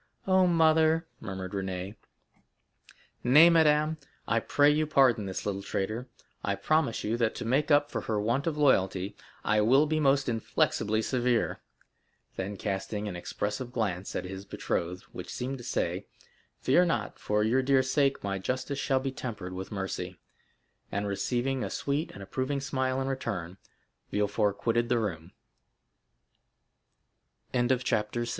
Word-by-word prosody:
"Oh, 185 -1 +4
mother!" 160 -1 +4
murmured 95 -3 -6
Renée. 95 0 -4 1.3
"Nay, 150 +7 +8
madame, 155 -1 +4 0.3
I 115 +1 +2
pray 145 +5 +4
you 155 +1 +1
pardon 130 -8 +3
this 95 - -4
little 100 -1 -2
traitor. 110 +5 -3 0.4
I 100 - 0
promise 155 -1 +1
you 110 +3 0
that 115 -2 +1
to - - -5
make 135 +6 +1
up 145 -1 +4
for - - -2
her 110 -2 -1
want 120 +8 0
of 155 -2 -1
loyalty, 95 -8 +2 0.3
I 105 0 +3
will 130 +7 +5
be 155 +1 0
most 140 -1 +3
inflexibly 110 -1 0
severe;" 125 -1 0 0.7
then 100 +2 -4
casting 100 +1 -3
an 95 - -4
expressive 105 +7 -4
glance 100 -6 -2
at 90 - -2
his 95 +1 -6
betrothed, 90 -2 -3
which - - -8
seemed 130 +2 -4
to - - -9
say, - - -2 0.5
"Fear 170 +8 +4
not, 120 -10 -2
for 105 0 +1
your 120 +5 +3
dear 135 0 +3
sake 135 +1 +1
my 100 -1 -2
justice 130 +7 -3
shall 135 -1 +1
be 135 0 -3
tempered 105 -8 -6
with 95 +1 -6
mercy," 95 -2 -4 0.7
and 100 +1 -1
receiving 125 +6 -1
a - - -3
sweet 145 +3 -2
and 100 -1 -9
120 Hz, 130 wpm, -29 LUFS, 100-140 Hz, 1.3 s, Nay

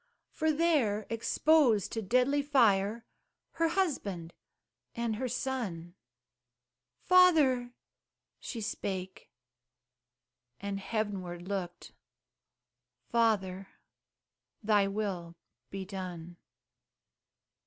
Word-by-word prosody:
For 315 0 +1
there, 285 -10 +1
exposed 230 - +3
to 225 - -3
deadly 255 +7 +2
fire, 230 -6 +2 0.5
Her 330 0 +1
husband 205 - -2 0.6
and 235 -2 -2
her 255 +2 -2
son 230 -10 -4 1.1
"Father," 295 -10 +4 0.6
she 230 - -6
spake, 190 -3 -5 1.3
and 200 0 -4
heavenward 190 -5 -4
looked, 185 -3 -5 1.2
"Father, 195 -5 +1 1.0
thy 205 -2 +3
will 195 -5 -3 0.3
be 195 -1 -5
done." 180 -3 -7
215 Hz, 75 wpm, -31 LUFS, 190-255 Hz, 1.3 s, Father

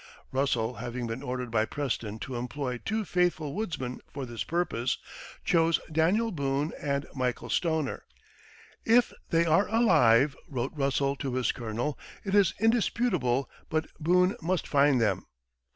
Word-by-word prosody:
Russell 125 -4 +1
having 120 0 -4
been 115 +2 -4
ordered 125 -3 -4
by 110 -1 +3
Preston 115 -4 -3
to 125 +3 -6
employ 125 +1 -3
"two 215 - -2
faithful 170 -5 0
woodsmen" 160 - -3
for 140 -2 -5
this 120 -2 -4
purpose, 160 -8 -1 0.5
chose 165 -1 +3
Daniel 185 +9 +2
Boone 140 -1 -1
and 140 -1 -1
Michael 125 -3 -2
Stoner. 160 -5 0 0.8
"If 240 +2 +4 0.2
they 165 0 +3
are 165 +5 +3
alive," 150 - +4
wrote 130 -1 -3
Russell 140 -1 +1
to 135 -2 -3
his 130 -1 +1
colonel, 120 +5 -3 0.3
"it 195 - -2
is 200 -4 +4
indisputable 205 - +2 0.2
but 155 0 0
Boone 180 +4 +3
must 180 +2 -1
find 140 -2 +4
them." 105 -5 0
140 Hz, 140 wpm, -29 LUFS, 125-170 Hz, 0.8 s, If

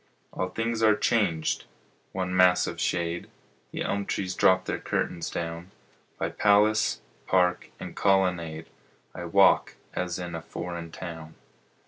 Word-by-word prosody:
All 95 - -2
things 115 +3 -2
are 110 -1 +5
changed. 95 -11 +1 0.5
One 90 -1 -2
mass 90 -1 +5
of - - -5
shade, 85 0 -1 0.4
The - - -3
elm 100 0 -2
trees 95 -1 -2
drop 95 0 +4
their - - -2
curtains 85 -2 -2
down; 85 +1 -5 0.5
By - - -1
palace, 105 +1 +3 0.3
park, 90 -1 +2
and - - -7
colonnade 90 -5 +1 0.5
I 90 - -6
walk 95 +3 +4 0.2
as 90 -1 -2
in 90 -1 -5
a 80 - -4
foreign 85 0 -6
town. 80 -3 -8
90 Hz, 135 wpm, -27 LUFS, 85-100 Hz, 0.5 s, are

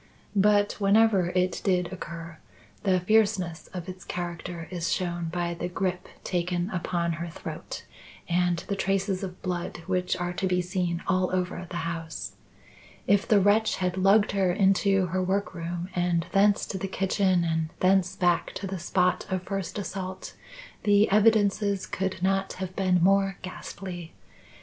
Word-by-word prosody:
But, 205 +1 +3
whenever 200 -2 +4
it 180 -1 +1
did 180 -2 +1
occur, 165 -2 -8 0.4
the 185 -2 +2
fierceness 200 -4 +1
of 180 -1 -7
its 185 0 -8
character 170 -1 -5
is 175 -2 -2
shown 175 -2 -1
by 170 +1 -2
the 170 +1 -3
grip 180 0 -2 0.2
taken 180 +1 -1
upon 175 -2 -1
her 170 +1 -4
throat - - -7 0.4
and 175 0 +2
the 200 - -1
traces 195 0 0
of 185 -2 -7
blood 175 -2 -3
which 180 -1 0
are 175 0 -2
to 190 - -1
be 180 -1 +1
seen 180 -1 -1
all 185 -1 +1
over 180 -1 -2
the 175 - -4
house. 165 -2 -4 0.7
If 200 0 +3
the 210 - +5
wretch 205 +3 +3
had 180 -1 -1
lugged 195 +3 +4
her 195 -2 +2
into 195 0 +3
her 185 +2 -1
workroom 175 -2 -2
and 175 -1 +1
thence 200 +1 +4
to 190 - -3
the 195 - -2
kitchen, 190 -1 +1
and 160 -1 0
thence 185 -1 +3
back 175 -2 +1
to 200 - -4
the 190 -1 -4
spot 180 +1 +1
of 185 -1 -1
first 195 -1 -4
assault, 190 -2 -5 0.5
the 205 0 +4
evidences 205 -2 +3
could 190 -1 -3
not 195 0 +1
have 185 0 -6
been 185 -3 +2
more 195 0 +3
ghastly. 185 -2 -7
185 Hz, 155 wpm, -27 LUFS, 175-195 Hz, 0.7 s, the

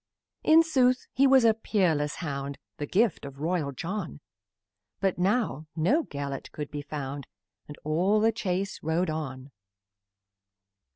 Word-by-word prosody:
In 320 +1 +6
sooth, 255 -5 +2
he 275 +2 +4
was 265 -2 +6
a 225 - +6
peerless 170 -9 0
hound, 140 -4 -4 0.2
The 145 - -4
gift 210 +2 +2
of 140 -1 -9
royal 160 -2 -1
John, 170 - -5 0.8
But 190 -2 0
now 180 - 0
no 235 - +2
Gelert 140 -1 -5
could 150 -2 -6
be 145 - -4
found, 145 -2 -5 0.4
And 145 - -9
all 180 +8 +2
the 225 +1 +4
chase 195 -3 -2
rode 160 +2 0
on. 135 -3 -5
165 Hz, 135 wpm, -28 LUFS, 145-215 Hz, 0.8 s, In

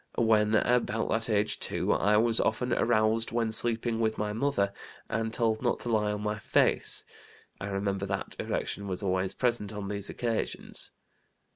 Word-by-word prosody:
When 110 -2 +3
about 115 0 +1
that 115 +1 +1
age 105 -1 +1
too - - 0
I 105 +1 +3
was 115 +1 +3
often 125 +3 +1
aroused 110 0 +2
when 115 -1 0
sleeping 115 0 +1
with 110 -1 0
my 105 0 -2
mother, 110 -5 0 0.3
and 110 0 -1
told 110 -1 +1
not 120 - +1
to 120 - -4
lie 105 -2 +2
on 105 0 -4
my 105 0 -2
face. - - +2 0.5
I 100 - -4
remember 100 0 -2
that 100 0 -3
erection 100 - -2
was 95 +1 -2
always 95 0 0
present 120 -5 0
on 105 -2 -5
these 100 -1 -4
occasions. 115 -2 -3
110 Hz, 165 wpm, -29 LUFS, 105-115 Hz, 0.5 s, When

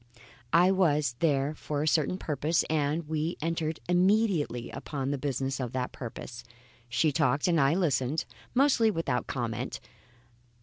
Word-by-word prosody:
I 180 +3 +5
was 150 -9 +2
there 145 -2 +1
for 150 -1 -3
a - - -1
certain 155 +3 +2
purpose 155 0 0
and 150 +1 0
we 160 +2 -2
entered 160 0 -2
immediately 180 - +2
upon 140 -2 -4
the 145 - -1
business 135 0 -2
of 125 -2 -4
that 125 -1 -2
purpose. 120 0 -8 0.5
She 130 +6 +2
talked 145 +2 +1
and 170 -4 +3
I 135 +4 +3
listened, 150 -5 0 0.3
mostly 255 -4 +4
without 160 -10 -1
comment. 120 -5 -3
150 Hz, 140 wpm, -29 LUFS, 135-170 Hz, 0.5 s, I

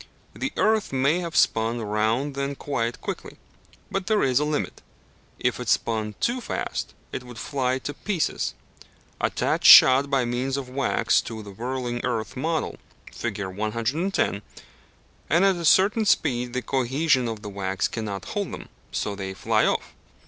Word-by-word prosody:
The 265 - -3
earth 220 -1 +2
may 135 +6 +2
have 170 -2 -5
spun 115 +1 +2
round 110 +6 0
then 140 +1 -3
quite 120 -5 -2
quickly. - - -6 0.5
But 195 -1 -2
there 215 -1 +2
is 130 -1 +3
a - - +1
limit. 150 -1 -2 0.6
If - - 0
it - - -4
spun 110 -2 0
too 245 +1 0
fast - - -4 0.2
it - - -5
would 125 -1 -11
fly 130 -2 -1
to 145 +2 -5
pieces. 185 +2 -2 0.6
Attach - - 0
shot 135 +2 +9
by 135 -3 +2
means 125 +3 -1
of 135 -2 -4
wax 135 +1 +2
to 110 -2 -7
the 100 - -10
whirling 120 +3 -3
earth 115 -3 -2
model, 160 +4 -2 0.3
Fig. 105 -4 -3
110, 115 - -1 0.9
and 170 +5 +4
at 195 -1 +4
a 170 - -5
certain 205 +7 +4
speed 125 -10 +1
the 125 -1 -2
cohesion 130 +1 +1
of 110 -2 -5
the 105 - -5
wax 95 -1 -1
cannot 105 -4 -5
hold - - -3
them, - - -8 0.2
so 105 - -2
they 95 -1 -5
fly - - +2
off. - - -1
130 Hz, 160 wpm, -25 LUFS, 110-150 Hz, 0.9 s, shot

